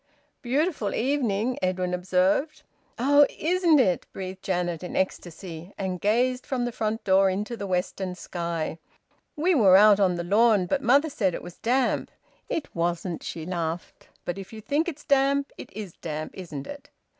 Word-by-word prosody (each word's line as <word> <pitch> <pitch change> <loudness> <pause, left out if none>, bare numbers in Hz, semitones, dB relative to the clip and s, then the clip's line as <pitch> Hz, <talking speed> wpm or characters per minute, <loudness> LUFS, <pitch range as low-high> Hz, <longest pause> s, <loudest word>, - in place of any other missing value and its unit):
"Beautiful 275 - 0
evening," 245 -3 0
Edwin 185 -1 -1
observed. 190 - +1 0.3
"Oh! 285 +4 +5
Isn't 345 -1 +3
it!" 185 -9 +2
breathed 190 0 -7
Janet, 175 -3 -1
in 180 - -6
ecstasy, 175 -1 -4
and 185 -2 -3
gazed 250 +4 +1
from 250 -3 -2
the 240 - -2
front 220 0 -2
door 195 0 +4
into 205 +5 -3
the 200 -3 -5
western 185 0 -2
sky. 170 -3 -4 0.6
"We 345 +5 +2
were 195 - +7
out 205 0 +7
on 185 -3 +3
the 170 - -3
lawn, 210 +1 +4
but 275 +10 0
mother 280 +6 +3
said 190 -9 0
it - - -7
was 175 - -11
damp. 250 +2 +1 0.4
It 315 - -2
wasn't," 170 0 -2
she 160 -2 -6
laughed. 170 -1 -4 0.2
"But 175 +2 -3
if 195 - -9
you 220 - -8
think 290 - 0
it's 305 -3 -6
damp, 280 0 +2
it - - -10
is 200 -3 -7
damp, 155 -2 -4
isn't 155 -7 -7
it? 285 0 -10
200 Hz, 170 wpm, -26 LUFS, 180-255 Hz, 0.6 s, were